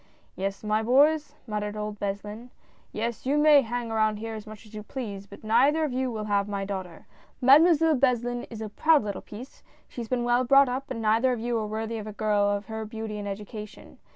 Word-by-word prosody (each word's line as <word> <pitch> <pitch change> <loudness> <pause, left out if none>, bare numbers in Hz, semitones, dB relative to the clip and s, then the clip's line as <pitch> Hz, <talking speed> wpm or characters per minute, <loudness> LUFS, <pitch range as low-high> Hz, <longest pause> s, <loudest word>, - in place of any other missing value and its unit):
"Yes, 195 +2 -4
my 215 +1 +1
boys," 290 +5 +3
muttered 210 -2 -4
old 210 0 -5
Beslin, 205 +4 -5 0.2
" - - -33
yes, 235 +3 -4
you 285 +2 +2
may 295 -1 +6
hang 240 -1 -4
around 215 -1 +1
here 225 +1 -5
as 215 0 -8
much 215 +1 -11
as 215 - -18
you 215 - -6
please, 205 -4 -6
but 200 - -13
neither 265 +9 +3
of 295 -5 -1
you 260 0 -1
will 220 -3 -4
have 200 -1 0
my 200 -1 -3
daughter 185 -4 -6 0.2
— - - -33
Mademoiselle 320 +2 +6
Beslin 245 -2 0
is 225 -2 -8
a 215 - -4
proud 310 +6 +3
little 200 -2 -4
piece; 240 +6 -11 0.3
she 245 - -7
has 230 - -6
been 250 -2 0
well 240 +1 +2
brought 275 +2 +6
up, 265 +3 -4
and 225 - -4
neither 225 +4 +3
of 240 - -4
you 240 +1 -2
are 215 - -3
worthy 220 +1 -4
of 215 - -7
a 215 - -6
girl 210 -1 +1
of 205 0 -2
her 220 -1 -5
beauty 220 -1 -6
and 205 - -5
education. 210 +1 -8
220 Hz, 230 wpm, -26 LUFS, 210-250 Hz, 0.3 s, may